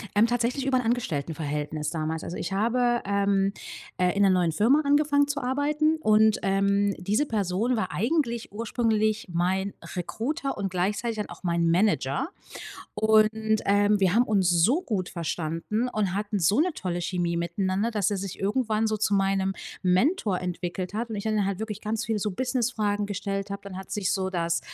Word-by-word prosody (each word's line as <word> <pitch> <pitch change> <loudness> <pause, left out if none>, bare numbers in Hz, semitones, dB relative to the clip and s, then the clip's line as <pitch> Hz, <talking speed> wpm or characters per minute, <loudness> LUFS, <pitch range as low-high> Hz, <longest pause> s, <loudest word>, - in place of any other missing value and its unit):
Ähm, 220 +3 +5
tatsächlich 245 +3 -1
über 265 -1 +2
'n 250 - 0
Angestelltenverhältnis 150 - -2
damals. 160 0 -3
Also, 175 - -5
ich 175 - -4
habe, 240 +3 +1
ähm, 200 0 +1 0.4
äh, 180 +1 +1
in 200 - +3
'ner 195 - +5
neuen 180 -3 +2
Firma 245 - +3
angefangen 285 0 +3
zu 285 0 -2
arbeiten 295 +4 +1
und, 215 0 +4
ähm, 200 +1 +2
diese 210 +10 0
Person 215 +1 0
war 200 -5 -2
eigentlich 235 - -1
ursprünglich 220 -1 0
mein 190 +3 0 0.2
Recruiter 270 - -3
und 195 -1 -2
gleichzeitig 205 +5 -1
dann 210 - -3
auch - - -11
mein 170 -1 +1
Manager. 170 - +1 0.7
Und, 220 0 +3
ähm, 205 +1 +3
wir 185 -1 +3
haben 240 +2 +5
uns 195 -5 +2
so 215 - +3
gut 190 - -2
verstanden 170 +7 -2
und 205 -6 -1
hatten 205 0 -2
so 195 - +3
'ne 360 +2 +2
tolle 175 -2 -3
Chemie 175 -1 -1
miteinander, 185 +6 -1
dass 210 -3 0
er 205 - -1
sich 190 -1 -5
irgendwann 215 +1 0
so 215 0 0
zu 205 -1 +1
meinem 195 -1 +1 0.3
Mentor 190 - +2
entwickelt 180 +1 -4
hat 235 +2 -2
und 215 - -3
ich 200 - -5
dann 215 -2 +1
halt 195 -2 -2
wirklich 215 -1 -5
ganz 220 +1 -2
viele 220 -2 -1
so 210 +1 -1
Business-Fragen 220 -3 -1
gestellt 195 0 -3
habe. 200 0 -5
Dann 195 -2 -8
hat 190 - -10
sich 200 -2 -1
so 190 -1 -1
das 170 -2 0
205 Hz, 180 wpm, -26 LUFS, 185-230 Hz, 0.7 s, Ähm